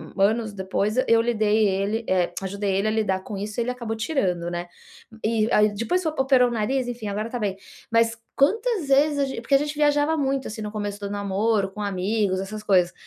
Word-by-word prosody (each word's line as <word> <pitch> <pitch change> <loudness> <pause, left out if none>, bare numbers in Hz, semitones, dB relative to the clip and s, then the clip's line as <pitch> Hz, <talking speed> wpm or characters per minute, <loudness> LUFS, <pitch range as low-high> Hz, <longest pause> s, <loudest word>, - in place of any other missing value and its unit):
u 195 - -2
anos 215 +1 +2
depois, 200 +3 -1
eu 230 0 +5
lidei 215 -2 +2
ele, 200 +4 -1
eh, 180 -2 +1
ajudei 200 0 -2
ele 200 +2 +1
a - - +2
lidar 200 -4 0
com 205 - -6
isso, 210 +3 -4
ele 240 +2 0
acabou 235 -3 -4
tirando, 185 - -1
né. 175 0 -4 0.6
E 220 0 +1
a 210 - +5
depois 230 - 0
operou 265 -5 +3
o - - -6
nariz, 245 +4 0
enfim, 235 -3 -5
agora 210 +3 -3
tá 245 - -4
bem. 200 -3 -2 0.3
Mas 230 0 +3 0.2
quantas 420 - +1
vezes 285 +2 +3
a 280 - +3
gen 265 -3 -5
porque 275 +4 +2
a - - +8
gente 295 +1 -3
viajava 295 +1 +2
muito, 275 -2 -1
assim, 220 0 -6
no 210 -1 -4
começo 205 -1 -4
do 200 - -5
namoro, 200 0 0
com 210 +2 -7
amigos, 200 0 0
essas 210 +2 -6
coisas, 180 -4 +3
215 Hz, 210 wpm, -24 LUFS, 200-250 Hz, 0.6 s, a